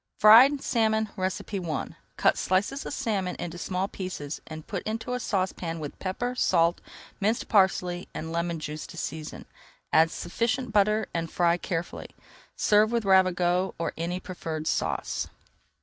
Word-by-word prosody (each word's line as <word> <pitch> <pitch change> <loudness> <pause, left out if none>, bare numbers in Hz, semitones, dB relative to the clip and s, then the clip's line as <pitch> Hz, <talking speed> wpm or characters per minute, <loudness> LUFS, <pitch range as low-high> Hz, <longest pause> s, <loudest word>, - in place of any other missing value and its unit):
FRIED 255 +7 +8
SALMON 220 -2 +1
I 185 -4 -3 0.3
Cut - - +4
slices 205 +10 0
of - - -5
salmon 195 -5 -1
into 175 0 -6
small 185 +2 -1
pieces 180 -7 -6
and 155 -1 -8
put 195 - -4
into 225 +3 -3
a 250 - -1
saucepan 185 -6 -2
with 150 -2 -7
pepper, 245 +6 -2
salt, 170 -8 +2 0.4
minced 215 +3 0
parsley, 185 -3 +2
and 160 +1 -6
lemon 170 0 -1
juice 155 0 -6
to 170 - -11
season. 155 -1 -5 0.5
Add 160 +1 +6
[Page - - -9
275] - - -6
sufficient 230 +6 -1
butter 210 +1 +3
and 165 -1 -2
fry 170 -1 +3
carefully. 170 -1 -4 0.5
Serve 215 +1 +4
with 235 -3 0
Ravigote 185 -1 +3
or 165 - -2
any 170 +2 -3
preferred 160 -4 -5
sauce. - - -1
185 Hz, 150 wpm, -27 LUFS, 170-215 Hz, 0.5 s, FRIED